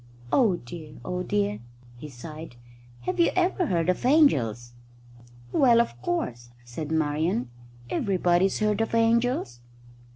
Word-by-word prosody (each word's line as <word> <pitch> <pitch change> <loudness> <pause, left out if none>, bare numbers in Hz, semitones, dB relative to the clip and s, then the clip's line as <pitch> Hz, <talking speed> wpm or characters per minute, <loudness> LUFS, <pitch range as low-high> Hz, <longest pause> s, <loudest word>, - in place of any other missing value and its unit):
"Oh 220 -9 +4
dear, 155 +1 -10
oh 180 0 -3
dear!" 105 - -1 0.4
he 150 +5 -9
sighed. 150 +2 -10 0.5
"Have 120 - -3
you 340 - +5
ever 365 -1 +1
heard 170 -5 0
of 185 - 0
angels?" 125 - +3 0.8
"Well, 240 - +5
of 120 - -1
course," 120 -6 -3 0.2
said 145 +6 -6
Marian. 150 -5 0 0.4
"Everybody's 185 +2 +1
heard 210 0 +1
of 225 +1 -1
angels." 230 - +1
170 Hz, 125 wpm, -26 LUFS, -, 0.8 s, you